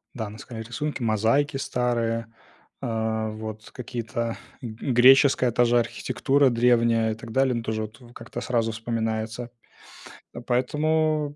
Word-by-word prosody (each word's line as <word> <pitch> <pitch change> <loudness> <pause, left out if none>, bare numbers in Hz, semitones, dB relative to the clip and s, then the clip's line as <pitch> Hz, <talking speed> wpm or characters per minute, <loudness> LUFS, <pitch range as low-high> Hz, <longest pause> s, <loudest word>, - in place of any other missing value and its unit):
Да, 110 -4 -4
наскальные 110 +1 -8
рисунки, 145 +3 -4
мозаики 115 +6 +2
старые, 120 -3 -1 0.6
а, 110 -1 -1
вот 110 0 -7
какие-то, 115 -1 -4 0.2
греческая 125 +2 +4
та 120 +1 +3
же 120 0 +4
архитектура 135 +3 +1
древняя 115 -2 +3
и - - -3
так 115 0 -10
далее. 130 +1 +2
Ну, 115 - -2
тоже 110 -1 -2
вот 110 +4 -9 0.2
как-то 120 +1 -7
сразу 115 -3 0
вспоминается. 115 +1 -3 0.8
А, 120 - -7
поэтому, 150 +4 0
120 Hz, 125 wpm, -25 LUFS, 110-130 Hz, 0.8 s, греческая